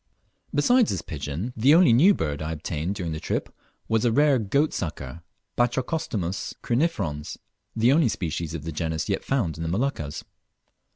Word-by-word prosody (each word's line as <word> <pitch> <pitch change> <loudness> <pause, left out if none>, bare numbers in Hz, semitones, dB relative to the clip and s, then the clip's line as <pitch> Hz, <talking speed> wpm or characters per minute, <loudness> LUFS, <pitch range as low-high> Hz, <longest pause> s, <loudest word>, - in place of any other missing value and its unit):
Besides 235 - +4
this - - -2
pigeon, 80 - -5
the 130 +7 +5
only 170 -9 +6
new 180 - +6
bird 75 -2 -3
I 80 +1 -3
obtained 80 +4 -3
during 90 -5 -3
the 80 - -4
trip - - -3 0.3
was 110 -1 +1
a 120 - +3
rare 145 +1 +4
goat 140 +9 +1
sucker 85 0 -5 0.3
(Batrachostomus 120 - -1
crinifrons), 105 - -1 0.4
the 115 +3 +4
only 150 -1 +4
species 85 -3 -3
of 75 - -6
the 80 - -4
genus 80 0 -3
yet - - -1
found 110 - -1
in - - -7
the 80 - -2
Moluccas. 90 - -2
100 Hz, 165 wpm, -25 LUFS, 80-135 Hz, 0.4 s, only